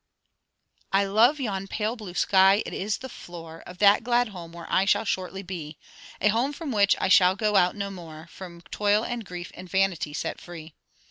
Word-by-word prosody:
'I 200 +1 +4
love 230 +9 +4
yon 195 -6 -3
pale 215 +3 -2
blue 205 -7 -9
sky; 195 +2 +4
it - - -6
is 200 +2 -2
the 260 - -8
floor 165 -7 -10
Of 180 - -10
that 205 +2 +5
glad 240 0 +2
home 175 -4 -9
where 170 0 -10
I 190 - +2
shall 210 +2 +2
shortly 190 0 -3
be; 165 -5 -7 0.4
A 210 - +3
home 240 +7 +1
from 305 -2 -5
which 205 -3 +4
I - - +1
shall 185 0 +5
go 210 0 0
out 180 -2 +4
no 200 -1 -4
more, 165 -4 -10
From 175 -3 -10
toil 210 +2 +2
and 240 -2 -4
grief 180 -2 -8
and 180 0 -11
vanity 190 -6 0
set - - -4
free. 165 -3 -10
195 Hz, 200 wpm, -26 LUFS, 175-210 Hz, 0.4 s, that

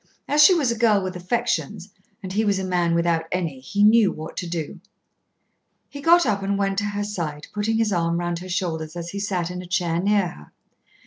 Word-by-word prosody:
As 295 +1 +5
she 370 +4 +7
was 280 -8 +1
a - - -1
girl 215 -4 +3
with 185 0 -4
affections, 210 0 -2 0.3
and 185 -1 -5
he 215 +2 +1
was 200 -2 +1
a 190 - -3
man 175 -2 +1
without 170 -1 +1
any, 165 -7 -2
he 200 +11 -1
knew 215 -1 +5
what 155 +1 -8
to 180 - -3
do. 170 +2 -5 1.1
He 285 - -9
got 340 +2 +5
up 205 -4 0
and 200 +1 -1
went 195 0 0
to 205 - -2
her 205 0 -2
side, 165 -8 -4
putting 215 +2 0
his 225 -2 +1
arm 170 -1 0
round 175 -1 -2
her 185 +1 -9
shoulders 160 -3 -3
as 170 0 -5
he 200 - -5
sat 185 -4 -2
in 180 0 -5
a 180 - -10
chair 175 -1 0
near 200 -2 +2
her. 75 - -14
185 Hz, 220 wpm, -23 LUFS, 170-210 Hz, 1.1 s, she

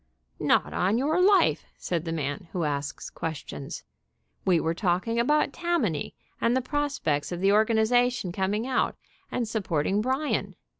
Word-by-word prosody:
"Not - - +2
on 195 +5 +2
your 310 +7 +2
life," 395 +1 +4
said 170 -2 -2
the 165 - -2
man 150 +1 -3
who 175 - -1
asks 145 -2 -3
ques 160 -2 -3
tions. 70 -1 -7 0.6
"We 180 -3 +4
were 160 +1 0
talking 190 +6 0
about 285 +3 +2
Tammany, 335 - -1 0.3
and 235 +2 +3
the - - +1
prospects 265 - -1
of 175 - -3
the 195 +2 +3
organization 220 0 +3
coming 195 +4 -1
out 260 -1 0 0.4
and 240 -2 -1
sup 215 -3 -3
porting 170 +6 +1
Bryan. 265 +6 -1
210 Hz, 155 wpm, -27 LUFS, 170-255 Hz, 0.6 s, life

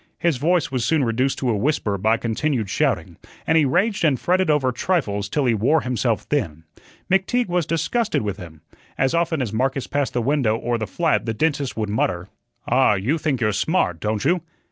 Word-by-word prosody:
His 170 -6 +1
voice 165 +3 +1
was 130 -3 -1
soon 150 +4 +2
reduced 125 +3 0
to 130 - -1
a - - 0
whisper 105 -3 0
by 110 +4 +2
continued 115 -1 -2
shouting, - - -1 0.3
and 160 - +2
he 160 -2 +5
raged 190 - +1
and 145 -6 +2
fretted 185 0 +1
over 145 -4 +2
trifles 110 - -1
till 145 +4 0
he 120 - +3
wore 130 +9 +2
himself 120 -4 -1
thin. 85 - -2 0.4
McTeague 190 +5 +1
was 175 -3 0
disgusted 165 - 0
with 100 -2 -3
him. 80 -3 -11 0.4
As 135 0 +1
often 165 -4 +1
as 110 -4 -5
Marcus 130 +3 0
passed 145 -2 -2
the 120 - 0
window 130 -5 +1
of 120 0 -1
the 110 - -3
flat 160 - 0
the 115 - -1
dentist 145 -1 -1
would 110 -2 -2
mutter: 95 -3 -1 0.4
"Ah, 125 -3 +4
you 125 - -1
think 145 -6 -1
you're 110 -2 +2
smart, 95 - 0
don't 105 +1 -2
you?" 175 +3 +2
130 Hz, 200 wpm, -22 LUFS, 110-160 Hz, 0.4 s, he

